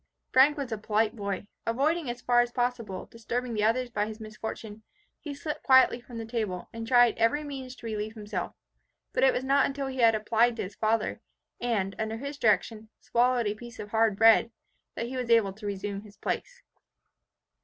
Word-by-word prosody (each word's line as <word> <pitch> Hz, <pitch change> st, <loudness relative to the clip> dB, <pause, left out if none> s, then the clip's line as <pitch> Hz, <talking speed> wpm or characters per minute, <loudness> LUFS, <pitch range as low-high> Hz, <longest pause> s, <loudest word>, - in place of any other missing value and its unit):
Frank 275 Hz, +4 st, +5 dB
was 275 Hz, -4 st, -4 dB
a 220 Hz, -, -3 dB
polite 215 Hz, +1 st, +1 dB
boy. 200 Hz, -2 st, -4 dB, 0.2 s
Avoiding, 285 Hz, +5 st, +1 dB
as 240 Hz, 0 st, -5 dB
far 240 Hz, -1 st, +4 dB
as 240 Hz, 0 st, -1 dB
possible, 240 Hz, -6 st, -2 dB
disturbing 235 Hz, +1 st, -4 dB
the 210 Hz, -1 st, 0 dB
others 240 Hz, +3 st, +1 dB
by 210 Hz, -2 st, -1 dB
his 220 Hz, 0 st, -8 dB
misfortune, 220 Hz, 0 st, -7 dB, 0.4 s
he 295 Hz, -, -7 dB
slipped 295 Hz, +2 st, -5 dB
quietly 260 Hz, -2 st, +5 dB
from 240 Hz, -1 st, -10 dB
the 225 Hz, -, -5 dB
table, 215 Hz, -6 st, -3 dB
and 225 Hz, 0 st, -6 dB
tried 245 Hz, -1 st, +5 dB
every 230 Hz, +7 st, +2 dB
means 265 Hz, -3 st, -7 dB
to 235 Hz, -, -13 dB
relieve 215 Hz, 0 st, -4 dB
himself. 205 Hz, -4 st, -5 dB, 0.6 s
But -, -, +1 dB
it 265 Hz, -, +6 dB
was 255 Hz, -, -2 dB
not 275 Hz, +1 st, +3 dB
until 275 Hz, 0 st, -4 dB
he 265 Hz, -1 st, -5 dB
had 230 Hz, -2 st, +5 dB
applied 225 Hz, +2 st, +2 dB
to -, -, -3 dB
his 195 Hz, +1 st, -7 dB
father, 220 Hz, +1 st, 0 dB, 0.4 s
and, 210 Hz, -5 st, -1 dB
under 220 Hz, 0 st, -2 dB
his 280 Hz, +3 st, -6 dB
direction, 215 Hz, 0 st, +1 dB
swallowed 245 Hz, 0 st, +2 dB
a 205 Hz, -, 0 dB
piece 240 Hz, +3 st, -11 dB
of 210 Hz, -, -7 dB
hard 225 Hz, -2 st, +3 dB
bread, 225 Hz, +1 st, +6 dB, 0.5 s
that -, -, -3 dB
he 255 Hz, +2 st, -5 dB
was 250 Hz, -2 st, -3 dB
able 225 Hz, -4 st, +4 dB
to 210 Hz, +1 st, -8 dB
resume 200 Hz, 0 st, -4 dB
his 205 Hz, -1 st, -16 dB
place. -, -, -4 dB
230 Hz, 195 wpm, -28 LUFS, 215-250 Hz, 0.6 s, it